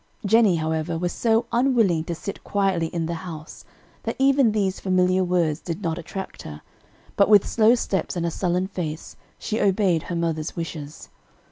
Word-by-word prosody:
Jennie, 215 -2 +4
however, 160 +1 -2
was 175 +1 -1
so 225 +3 +1
unwilling 235 -10 +2
to 170 - -3
sit 200 +4 -7
quietly 195 -5 0
in 165 0 -3
the 170 - -3
house 160 -4 -9 0.4
that - - -3
even 270 -3 +4
these 195 -3 -1
familiar 185 0 +2
words 170 -4 +1
did 170 +3 -6
not 165 0 -2
attract 190 +3 -7
her, 75 -1 -9 0.5
but 200 - +4
with 205 -2 +6
slow 225 +1 +4
steps 195 -6 -2
and 170 -1 -1
a 170 - -1
sullen 180 +1 0
face, 165 -5 -5 0.2
she 220 - -3
obeyed 190 -4 +2
her 175 - -2
mother's 165 -2 -2
wishes. 155 -3 -7
180 Hz, 170 wpm, -23 LUFS, 165-205 Hz, 0.5 s, with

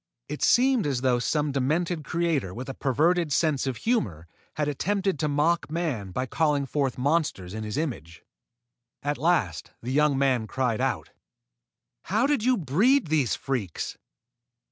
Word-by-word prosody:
It 150 - -6
seemed 250 - +4
as 130 -4 -1
though 125 -2 +2
some 150 +3 0
demented 155 +5 0
creator 155 - -1
with 125 +3 -6
a - - -3
perverted 155 +6 +1
sense 145 -2 +1
of 130 -3 -2
humor 100 - -1 0.3
had 150 -1 -1
attempted 195 +4 -1
to 155 - +1
mock 150 +3 +1
man 150 - -2
by 125 +8 -2
calling 145 0 +1
forth 135 -2 -1
monsters 135 - 0
in 110 0 -4
his 105 +4 -4
image. 100 - -4 0.8
At 145 -2 -1
last 120 - +1
the 125 - -3
young 150 0 +3
man 130 -5 +1
cried 125 -2 -1
out: - - -1 0.9
"How 215 +7 +1
did 280 -6 +1
you 255 0 +3
breed 195 - +2
these 150 -6 +2
freaks?" 120 - -4
145 Hz, 155 wpm, -26 LUFS, 125-170 Hz, 0.9 s, seemed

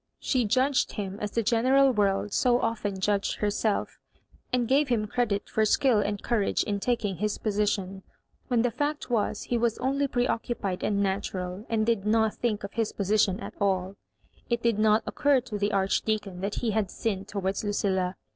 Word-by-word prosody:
She 255 -4 +1
judged 260 +5 +2
him 200 -1 -5
as 210 - -2
the 230 +2 -1
general 260 +4 +4
world 205 -2 0
so 245 -1 +3
often 210 -4 -2
judged 200 +1 0
herself 210 0 -1 0.5
and 245 -2 +1
gave 280 +3 +3
him 230 -4 +1
cre 245 +4 0
dit 200 -2 -2
for 220 - +1
skill 230 +1 +3
and 205 -1 -2
courage 230 -4 +1
in 205 -1 -2
taking 205 -4 -1
his 210 0 -1
position, 200 -2 -1 0.5
when 240 -3 +2
the 245 - +1
fact 290 +2 -3
was 215 -2 0
he 240 - -1
was 235 -1 +1
only 275 +2 0
preoccupied 230 -6 -2
and 200 -1 +1
natural, 190 0 -3
and 220 -1 +1
did 230 -4 +1
not 220 0 +2
think 215 -4 -2
of 200 - -6
his 225 -1 -1
position 200 -1 +1
at - - -7
alL 190 -1 0 0.5
It 235 -1 0
did 230 -3 +2
not 215 0 +4
occur 285 -2 +2
to 230 -4 -6
the 205 +1 0
Archdeacon 195 -1 0
that 200 +1 -2
he 235 -3 -1
had 210 -2 0
sinned 200 -2 -3
towards 195 -1 -2
Lucilla. 190 -3 0
215 Hz, 185 wpm, -27 LUFS, 200-235 Hz, 0.5 s, general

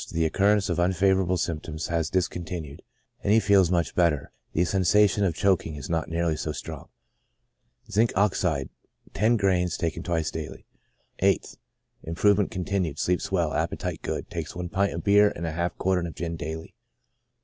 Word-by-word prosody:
— - - -10
The 80 - 0
recurrence 100 +5 +2
of 85 -1 -1
unfavorable 95 +1 +2
symptoms 80 -1 -3
has 80 -2 0
discontinued, 85 -5 -3 0.4
and 100 - +1
he 110 - +6
feels 100 -4 +4
much 85 -3 0
better; 80 -5 +1 0.2
the 90 - +1
sensation 100 +3 +3
of 90 -5 +1
choking 90 -4 +1
is 70 +2 -7
not 80 -2 -1
nearly 85 -1 0
so 75 - -3
strong. - - -8 1.0
Zinc. 110 +4 +3
Ox., 100 0 +2
gr.x, 75 -7 0 0.5
bis 110 -1 +2 0.8
die. 80 -2 -7 0.6
8th. 95 -3 +1 0.2
— - - -43
Improvement 100 +5 +2
continued, 90 -4 -2
sleeps 90 +1 -1
well, 85 -5 +1
appetite - - -2
good; - - -4
takes 85 0 -5
one 90 0 -4
pint 100 +3 0
of - - -5
beer 105 0 +5
and 85 - -4
half 85 +2 -2
a - - -43
quartern 90 -2 0
of 80 - -9
gin, 85 -1 -4
daily. 80 0 -6
90 Hz, 160 wpm, -26 LUFS, 80-95 Hz, 1.0 s, he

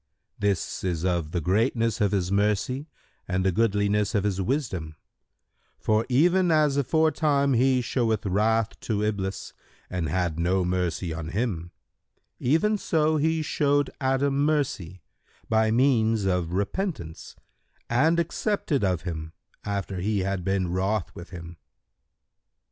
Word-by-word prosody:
"—"This 100 -4 -1
is 90 -2 -1
of 85 -4 0
the 85 +1 -2
greatness 115 - +1
of 100 -2 +3
His 95 -3 0
mercy 105 +8 0 0.4
and 95 0 -1
the 95 - +3
goodliness 105 +1 +1
of 100 - +2
His 100 -2 0
wisdom; 95 - -2 0.8
for, 110 +1 +1
even 175 +8 +3
as 155 -3 +3
aforetime 145 -1 +2
he 130 +1 +3
showed 115 -4 0
wrath 110 +3 +1
to 105 -2 -2
Iblis 100 -2 -3 0.4
and 85 -4 -2
had 85 -1 -1
no 90 +2 +1
mercy 90 -2 -1
on 80 -1 -5
him, 90 -3 -2 0.7
even 165 - +2
so 155 -3 +1
he 160 +1 +1
showed 145 -1 +1
Adam 135 +1 +1
mercy, 140 - -1 0.5
by 110 0 +3
means[FN#131] 115 -3 +2
of 85 -1 -3
repentance, 100 - -3 0.5
and 155 +8 +3
accepted 170 - -1
of 90 -4 0
him, 80 -3 -5 0.3
after 100 -2 -3
He 100 +2 0
had 95 -1 -2
been 95 -1 0
wroth 95 0 -1
with 85 - -10
him." 85 -2 -9
105 Hz, 130 wpm, -26 LUFS, 90-135 Hz, 0.8 s, of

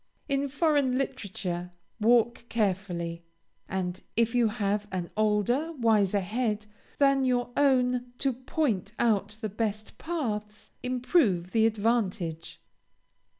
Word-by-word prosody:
In 275 -1 0
foreign 285 -3 +2
literature, 190 -9 -3 0.3
walk 235 +1 +3
carefully, 180 -6 -1 0.5
and 185 -1 -3 0.2
if 230 0 +3
you 240 -2 +4
have 210 -1 -1
an 180 -2 -3
older, 215 +9 +1
wiser 215 - +2
head 215 +1 -1 0.3
than 275 -1 +4
your 245 -1 +1
own 250 -3 +2
to 270 0 +1
point 240 - -1
out 215 -2 +1
the 220 - -1
best 215 +1 -3
paths, 215 -11 -4
improve 250 - +1
the 225 -1 +4
advantage. 200 -7 -1
220 Hz, 110 wpm, -28 LUFS, 200-255 Hz, 0.5 s, you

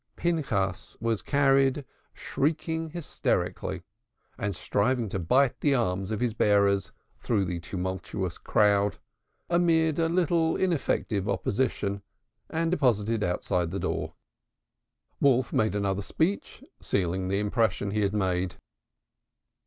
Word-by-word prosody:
Pinchas 115 - -1
was 115 -2 0
carried, 135 -1 +2 0.3
shrieking 160 +2 -1
hysterically, 170 -1 -2 0.5
and 100 -2 -3
striving 120 +5 0
to 95 - -3
bite 125 +10 +2
the 145 -2 +2
arms 95 -5 0
of 110 0 -2
his 120 -3 +1
bearers, 100 -3 +2 0.3
through 105 -5 0
the 90 -1 -3
tumultuous 95 +1 -4
crowd, 105 -2 +2 0.5
amid 165 -2 +2
a 165 -1 +2
little 170 -2 +2
ineffective 135 - 0
opposition, 100 0 -1 0.5
and 165 +1 0
deposited 115 - +1
outside 90 -1 0
the 95 - -3
door. - - -3 1.0
Wolf 130 -3 +3
made 110 -1 +1
another 100 -1 0
speech, 165 - -2 0.2
sealing 95 0 -1
the 100 +1 0
impression 105 -1 0
he 105 +1 0
had 100 -1 +1
made. 95 -3 0
110 Hz, 115 wpm, -27 LUFS, 100-145 Hz, 1.0 s, Wolf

